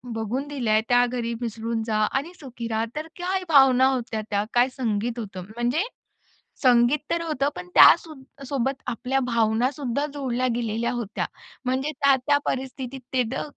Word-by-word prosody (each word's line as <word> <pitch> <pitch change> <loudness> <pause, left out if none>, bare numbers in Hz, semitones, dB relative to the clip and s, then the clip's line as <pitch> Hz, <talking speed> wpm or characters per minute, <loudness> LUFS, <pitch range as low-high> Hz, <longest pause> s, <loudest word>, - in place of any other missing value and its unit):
बघून 235 +6 -3
दिलं 255 -7 -2
आहे, 215 0 +4
त्या 245 0 +5
घरी 235 -1 -3
मिसळून 230 0 -3
जा 215 -1 0
आणि 300 +7 -2
सुखी 245 -5 -7
रहा." 220 +1 0
तर 310 +1 -4
काय 370 +1 -1
भावना 265 -3 +6
होत्या 235 -3 -3
त्या! 205 0 +1
काय 245 +2 +4
संगीत 235 -1 -1
होतं! 195 -4 -6
म्हणजे 245 +9 0 0.8
संगीत 245 +3 +5
तर 335 0 +1
होतं, 290 -3 0
पण 180 0 -7
त्यासो 330 -2 +7 0.3
सोबत 270 0 -2
आपल्या 260 +3 -1
भावनासुद्धा 245 +4 0
जोडल्या 255 -3 -1
गेलेल्या 235 0 -1
होत्या. 230 -4 -3 0.4
म्हणजे 260 +4 0
त्या-त्या 280 0 +3
परिस्थितीत 265 0 -4
ते, 255 -1 +3
त - - -2
250 Hz, 155 wpm, -24 LUFS, 230-275 Hz, 0.8 s, त्यासो